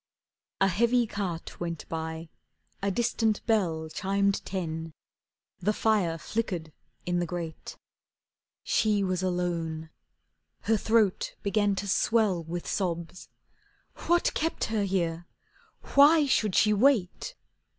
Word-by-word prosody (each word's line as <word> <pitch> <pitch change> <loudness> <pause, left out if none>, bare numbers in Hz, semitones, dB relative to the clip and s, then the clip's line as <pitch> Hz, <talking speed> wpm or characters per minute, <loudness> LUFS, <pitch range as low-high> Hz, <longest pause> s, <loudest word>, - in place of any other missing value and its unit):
A 195 - +4
heavy 235 +6 +2
cart 190 -6 -5
went 170 -2 -4
by, 160 0 -5 0.5
a 200 - 0
distant 220 +1 0
bell 175 -9 +1
Chimed 200 +4 0
ten, 165 -4 -4 0.7
the 210 +4 +1
fire 205 -7 +1
flickered 175 -5 -3 0.3
in 175 0 0
the 175 - -1
grate. 170 -2 -6 0.9
She 215 - +2
was 185 -1 -1
alone. 170 -3 -2 0.7
Her 225 - +2
throat 220 -2 +1
began 205 0 +2
to 200 +1 -4
swell 200 -3 +2
With 170 +2 -5
sobs. 175 -2 -3 0.8
What 345 0 +3
kept 325 +1 -1
her 210 -2 +1
here, 170 -3 -1 0.7
why 295 +2 +7
should 215 -7 +1
she 210 0 +4
wait? 245 - +2
190 Hz, 115 wpm, -28 LUFS, 170-220 Hz, 0.9 s, why